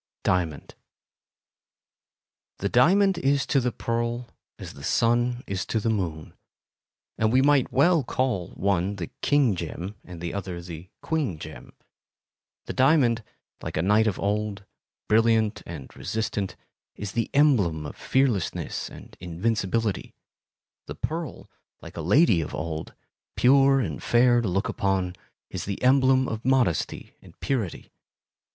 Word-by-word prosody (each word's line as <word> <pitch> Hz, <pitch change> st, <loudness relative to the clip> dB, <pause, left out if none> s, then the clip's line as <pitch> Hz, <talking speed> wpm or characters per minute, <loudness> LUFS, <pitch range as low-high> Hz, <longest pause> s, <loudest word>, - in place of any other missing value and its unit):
Diamond 85 Hz, -5 st, -1 dB, 1.8 s
The 100 Hz, -, -2 dB
diamond 185 Hz, -, +4 dB
is 140 Hz, -2 st, +2 dB
to 140 Hz, -, +2 dB
the 125 Hz, -1 st, 0 dB
pearl 120 Hz, +1 st, -2 dB, 0.3 s
as -, -, -9 dB
the 70 Hz, -, -12 dB
sun 120 Hz, -, +1 dB
is 95 Hz, 0 st, -3 dB
to 110 Hz, -, 0 dB
the 115 Hz, +1 st, 0 dB
moon, 85 Hz, -7 st, -3 dB, 0.9 s
and 110 Hz, 0 st, +2 dB
we 130 Hz, +2 st, +4 dB
might 145 Hz, -2 st, +3 dB
well 165 Hz, +3 st, +4 dB
call 120 Hz, -8 st, -1 dB
one 100 Hz, 0 st, 0 dB
the 90 Hz, -4 st, -6 dB
"king 140 Hz, -8 st, +3 dB
gem" 90 Hz, +3 st, -5 dB
and 90 Hz, -2 st, -10 dB
the 85 Hz, 0 st, -4 dB
other 95 Hz, -3 st, -4 dB
the 85 Hz, 0 st, -9 dB
"queen 150 Hz, -, -1 dB
gem." -, -, -10 dB, 0.9 s
The -, -, -5 dB
diamond, 130 Hz, -5 st, +3 dB, 0.4 s
like -, -, -5 dB
a 80 Hz, -, +1 dB
knight 105 Hz, +3 st, +4 dB
of 100 Hz, -, -1 dB
old,—brilliant 105 Hz, +2 st, 0 dB
and 80 Hz, -6 st, -9 dB
resistant, 105 Hz, -3 st, -3 dB, 0.4 s
is 100 Hz, -1 st, -5 dB
the 115 Hz, 0 st, -1 dB
emblem 105 Hz, -, +3 dB
of -, -, -7 dB
fearlessness 130 Hz, -9 st, -1 dB
and -, -, -13 dB
invincibility; 100 Hz, +3 st, -1 dB, 0.7 s
the -, -, -6 dB
pearl, 160 Hz, -1 st, -5 dB, 0.3 s
like -, -, -12 dB
a 85 Hz, -, -4 dB
lady 100 Hz, -, +4 dB
of 75 Hz, -, -5 dB
old,—pure 130 Hz, -, +1 dB
and 130 Hz, -, -3 dB
fair 120 Hz, 0 st, +4 dB
to 115 Hz, -, -2 dB
look 95 Hz, +2 st, 0 dB
upon, 95 Hz, -2 st, -1 dB, 0.4 s
is -, -, -4 dB
the 100 Hz, -1 st, -4 dB
emblem 130 Hz, 0 st, +4 dB
of 110 Hz, 0 st, -4 dB
modesty 125 Hz, -, 0 dB
and -, -, -18 dB
purity. 115 Hz, -10 st, -3 dB
110 Hz, 135 wpm, -26 LUFS, 90-130 Hz, 1.8 s, diamond